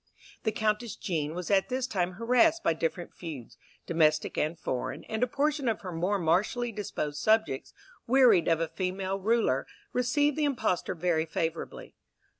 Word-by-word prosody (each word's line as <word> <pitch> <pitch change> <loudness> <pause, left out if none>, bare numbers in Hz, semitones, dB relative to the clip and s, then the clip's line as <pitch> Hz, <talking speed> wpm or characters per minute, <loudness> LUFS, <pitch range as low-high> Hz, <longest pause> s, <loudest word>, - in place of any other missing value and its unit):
The 220 - 0
Countess 220 0 -1
Jean 160 -4 -2
was 180 +2 -4
at 195 -1 +3
this 255 0 -1
time 185 -7 -1
harassed 250 - +3
by - - +3
different 165 +2 -3
feuds, 150 -9 -8 0.3
domestic 155 -2 +2
and 155 +3 -1
foreign, 130 +3 -3
and 220 0 -4
a 250 - +3
portion 285 +1 0
of 225 - -2
her 185 - -6
more 180 +5 0
martially 195 +8 +1
disposed 155 -8 -4
subjects, 215 -11 +1 0.4
wearied 240 -8 +5
of 165 0 +2
female 190 +2 -2
rule, 205 - +2 0.3
received 270 +4 +2
the 305 - +1
impostor 225 -13 0
very 165 -1 0
favourably. 160 +1 -4
190 Hz, 155 wpm, -29 LUFS, 165-235 Hz, 0.4 s, wearied